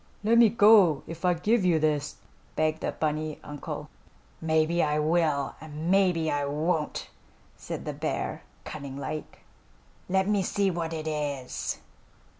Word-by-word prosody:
"Let 230 +2 +4
me 230 -2 +7
go 205 -8 +6
if 165 +1 -9
I 180 -1 +3
give 210 +5 +2
you 175 -3 +4
this," 150 -1 0 0.4
begged 155 0 0
the - - -1
bunny 155 0 -2
uncle. 145 -1 -6 0.5
"Maybe 160 +1 +2
I 150 0 +1
will, 150 -3 +1
and 155 +2 -4
maybe 180 -5 +3
I 145 0 0
won't," 150 +2 -1 0.4
said - - -7
the - - -3
bear, - - -3 0.2
cunning 140 -3 -7
like. 155 +2 -6 0.7
"Let 190 +1 +2
me 205 -1 +2
see 195 +1 +1
what 170 -2 -3
it 160 -1 -4
is." 145 -4 -3
160 Hz, 145 wpm, -27 LUFS, 150-180 Hz, 0.7 s, me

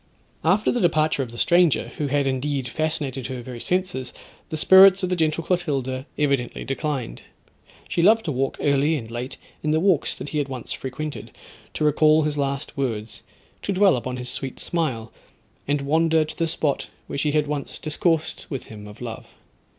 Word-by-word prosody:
After 190 +7 +3
the 245 - 0
departure 155 -4 +2
of 125 -3 -4
the 120 - -10
stranger, 175 +2 +3
who 150 - 0
had 140 0 +1
indeed 135 0 -1
fascinated 140 -3 -2
her 130 -2 -6
very 125 -1 -8
senses, 180 -6 -1 0.4
the 155 - -3
spirits 190 +3 +7
of 185 - 0
the 180 - +1
gentle 160 -1 0
Clotilda 140 -7 -1
evidently 140 -4 0
declined. 135 - -3 0.7
She 170 - 0
loved 220 +5 +5
to 155 - -1
walk 135 0 -1
early 145 +2 +2
and 115 -6 -6
late 120 +3 -5 0.2
in 155 - -1
the 155 +1 +3
walks 185 -3 +2
that 145 - -7
he 155 - -1
had 145 - -1
once 130 -3 -5
frequented, 150 +3 -5 0.5
to - - -1
recall 155 +1 +4
his 150 0 -1
last 140 0 -2
words; 115 -5 -3 0.4
to - - -2
dwell 195 -2 +5
on 130 -1 -4
his 125 0 -4
sweet 130 +1 -4
smile; 130 -10 -2 0.6
and 145 0 +1
wander 160 +2 +2
to 155 - -9
the 165 - 0
spot 155 -3 -1 0.2
where - - -4
she 150 0 0
had 150 -1 +2
once 145 -1 -4
discoursed 160 +1 -1
with 135 -4 -4
him 105 -1 -9
of 105 +3 -12
love. 115 -2 -6
145 Hz, 185 wpm, -24 LUFS, 130-160 Hz, 0.7 s, spirits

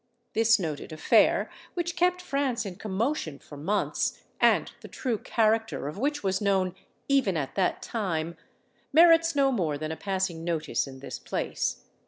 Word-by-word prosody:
This 225 0 +5
noted 160 -5 -4
affair, 155 - +3 0.3
which 345 -1 -2
kept 360 +1 +2
France 275 -7 -1
in 185 -3 -6
commotion 215 - -2
for 145 - -13
months, 185 +9 -1 0.2
and - - +3
the - - -9
true 240 -6 -2
character 225 -7 +1
of 150 - -5
which 290 +2 -1
was 190 +1 0
known 190 -3 +1 0.3
even 265 -11 +2
at 135 -3 -3
that 185 -2 0
time, 170 -7 -2 0.6
merits 330 +1 +6
no 275 -1 +4
more 165 - 0
than 155 +1 -4
a - - -3
passing 190 -3 -2
notice 165 -4 -1
in 130 -1 -10
this - - -6
place. - - -2
200 Hz, 160 wpm, -27 LUFS, 165-270 Hz, 0.6 s, merits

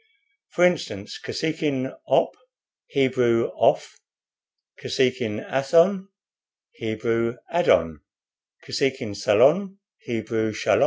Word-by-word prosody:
For 175 - 0
instance, 125 - -2
Kosekin 150 -5 -2
'Op,' - - +2 0.5
Hebrew 125 -4 +1
'Oph;' - - +1 0.8
Kosekin 120 -4 -1
'Athon,' 170 +8 +2 0.6
Hebrew 115 +1 -2 0.2
'Adon;' 80 - +2 0.7
Kosekin 130 -6 -2
'Salon,' 155 - +3 0.2
Hebrew 110 -3 -3
'Shalom.' - - +1
125 Hz, 75 wpm, -24 LUFS, 110-155 Hz, 0.8 s, Salon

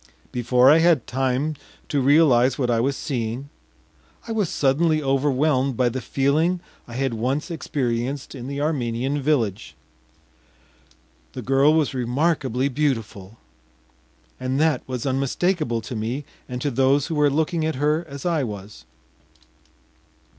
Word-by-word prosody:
Before 125 +2 +4
I 160 - +6
had 165 -6 +3
time 135 +4 -1 0.4
to 145 -2 +1
realize 130 -3 +4
what 125 -3 0
I 115 - +2
was 135 +3 0
seeing, 125 +1 -3 0.8
I - - -4
was 210 -6 0
suddenly 155 +3 +2
overwhelmed 135 -1 +1
by 125 -1 +3
the 130 +2 -4
feeling 150 +8 +1 0.3
I 120 - -9
had 135 -1 -1
once 130 +9 -2
experienced 130 -3 -3
in 130 -3 -7
the 140 +1 -4
Armenian 135 -2 -1
village. 120 -9 -1 1.6
The - - -6
girl 135 +4 +4
was 155 -4 +1
remarkably 130 0 0
beautiful, 115 -8 -2 1.0
and 130 +1 -1
that 155 -4 +2
was 130 -1 -4
unmistakable 135 0 0
to 120 +3 -7
me 120 +6 -3 0.2
and 125 0 -4
to 145 - 0
those 135 +2 +2
who 165 - -4
were 150 -1 +3
looking 160 +3 0
at 160 0 -1
her 150 +4 +1
as 140 +2 -8
I 165 -5 +1
was. 105 -3 -8
135 Hz, 140 wpm, -23 LUFS, 125-150 Hz, 1.6 s, I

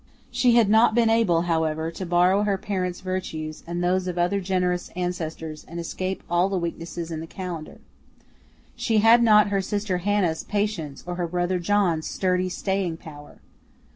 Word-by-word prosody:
She 245 -2 +3
had 230 -3 +5
not 220 +2 +4
been 230 -2 +4
able, 190 -8 +3
however, 160 -1 0
to 185 - -6
borrow 180 +3 +3
her 205 -2 +1
parents' 185 -3 -3
virtues 170 -5 -4
and 175 +1 -3
those 185 +1 +1
of 180 -1 -3
other 180 +3 +1
generous 180 -1 -1
ancestors 160 -3 -4
and 170 +1 -7
escape 185 +3 -4
all 175 +3 +2
the 195 - -1
weaknesses 170 -1 -5
in 160 - -4
the 165 - -7
calendar. 175 -4 -7 1.0
She 225 - 0
had 225 +3 +6
not 210 -2 +5
her 200 -1 +1
sister 200 -1 -2
Hannah's 185 -4 0
patience 205 -9 -3
or 175 0 -5
her 175 -1 -1
brother 180 +1 -1
John's 175 -4 +1
sturdy 185 -1 0
staying 190 -3 -2
power. 145 -3 -13
180 Hz, 170 wpm, -24 LUFS, 170-200 Hz, 1.0 s, had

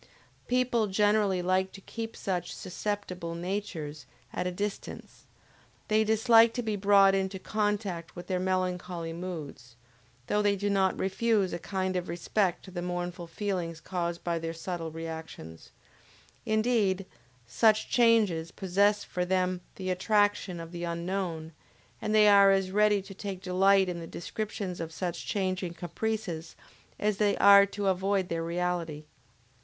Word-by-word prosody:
People 245 -3 +2
generally 205 -2 +2
like 185 +1 +1
to - - -10
keep 225 +2 -6
such 180 -3 -3
"susceptible 185 -3 -4
natures" 170 -5 -4 0.3
at 180 - -2
a - - -1
distance; 205 +3 -6 0.6
they 215 0 +4
dislike 225 +1 +5
to 245 - -2
be 215 -2 -1
brought 200 -1 +5
into 190 0 -1
contact 205 -4 -2
with 175 0 -8
their 185 0 -1
melancholy 180 -2 -2
moods, 155 -9 -7 0.5
though 210 - +1
they 205 -1 +2
do 205 +1 -1
not 190 -1 +2
refuse 195 0 +1
a 170 - -3
kind 190 0 -2
of 180 -2 -2
respect 175 +2 -1
to 190 - -11
the 175 -1 -4
mournful 175 0 -4
feelings 170 -3 -3
caused 170 0 -3
by 170 -1 -1
their 165 0 -4
subtle 165 -1 -4
reactions; 160 - -8 0.8
indeed 215 -4 +1 0.4
such 215 - +3
changes 215 -9 +3
possess 200 +3 +1
for 180 - -3
them 185 0 0
the 185 -1 -3
attraction 205 -1 +1
of 165 0 -8
the 175 -1 -6
unknown 170 -1 -3 0.5
and 215 - 0
they 210 -1 +7
are 200 -1 +7
as 195 -1 +2
ready 210 -1 +3
to 195 0 -10
take 195 -1 -6
delight 190 +1 +3
in 175 -1 -3
the 165 - -7
description 205 +2 -4
of 165 0 -5
such 175 0 -4
changing 185 -3 -2
caprices, 175 -1 -4 0.4
as 210 -1 0
they 205 -1 +2
are 200 0 +8
to 200 +1 -4
avoid 190 0 +1
their 165 0 -2
reality. 170 -3 -2
185 Hz, 150 wpm, -29 LUFS, 175-205 Hz, 0.8 s, are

